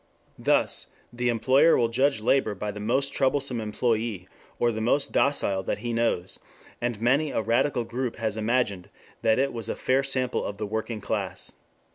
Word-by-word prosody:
Thus - - +2 0.3
the 120 0 0
employer 130 +7 +4
will 115 - +3
judge 130 0 +1
labor 110 -2 +2
by 105 +2 -4
the 105 - -8
most 130 +6 0
troublesome 135 -3 +1
employee 110 -3 -1 0.3
or 120 - +2
the 110 0 -4
most 130 +5 +1
docile 100 -9 +2
that - - -2
he 120 +2 -4
knows, 115 -6 -1 0.4
and 120 -3 -2
many 135 +7 +2
a 115 - -1
radical 120 +3 +1
group 120 +1 -3
has 110 -3 -2
imagined 110 -4 0 0.3
that 110 0 +3
it 135 0 +1
was 115 -1 -4
a - - -2
fair 130 +1 +1
sample 130 -2 0
of 100 - -5
the 105 - -3
working 110 +1 -4
class. 95 -4 -3
115 Hz, 175 wpm, -26 LUFS, 110-130 Hz, 0.4 s, employer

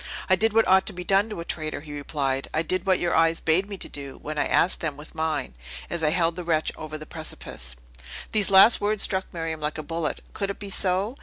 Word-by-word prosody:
"I 185 - +5
did 225 +4 +3
what 225 +1 +3
ought 190 +1 +5
to - - -2
be 180 0 -6
done 195 +4 +3
to 210 -6 -5
a - - -7
traitor!" 155 -3 -3
he 150 -1 -9
replied. 140 -2 -2
"I 155 - +2
did 185 +3 -1
what 185 -1 +4
your 175 - 0
eyes 165 0 +3
bade 180 +5 +1
me 200 - -5
do, 140 -6 -5
when 150 0 -4
I - - +1
asked 180 - +3
them 155 -4 -3
with 150 +2 -11
mine, 160 - -2 0.4
as 170 - 0
I 155 - +3
held 165 0 +1
the 180 - -5
wretch 160 -2 +1
over 155 0 -6
the 155 - -9
precipice!" 65 - -6 0.6
These 210 -2 +2
last 195 +4 +7
words 210 0 +2
struck 190 -1 -1
Miriam 165 -2 -4
like 150 +1 -2
a 155 - -4
bullet. 165 +1 -3
Could 200 -1 -2
it 200 - -4
be 200 -1 -6
so? 195 +7 0
165 Hz, 245 wpm, -25 LUFS, 155-190 Hz, 0.6 s, last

